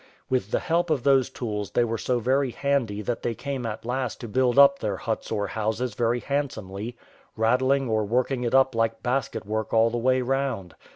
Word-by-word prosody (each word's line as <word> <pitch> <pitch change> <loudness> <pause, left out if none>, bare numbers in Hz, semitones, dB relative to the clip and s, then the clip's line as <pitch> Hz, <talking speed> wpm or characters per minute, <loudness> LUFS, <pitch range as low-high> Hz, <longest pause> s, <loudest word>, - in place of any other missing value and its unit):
With 125 -6 0
the - - 0
help 170 +1 0
of 145 -6 0
those 135 -3 +4
tools 105 -4 -4
they 120 - +2
were 115 -1 -2
so 125 - 0
very 130 +3 +1
handy 120 -6 -1
that 120 +3 -2
they 115 - -2
came 135 -2 -4
at 110 +1 -6
last 125 0 -2
to 120 - -5
build 125 +3 +1
up 140 0 +7
their 105 -3 -2
huts 110 +2 -4
or 105 -2 0
houses 110 +3 -2
very 120 +2 0
handsomely, 120 -6 -3 0.4
raddling 130 +4 +2
or 110 -1 +1
working 125 +4 0
it 120 +2 0
up 135 0 +4
like 115 0 -1
basket 125 -3 -1
work 110 +1 -3
all 115 +1 +4
the 120 - -1
way 130 +1 +2
round. 130 -9 -2
120 Hz, 205 wpm, -25 LUFS, 110-130 Hz, 0.4 s, up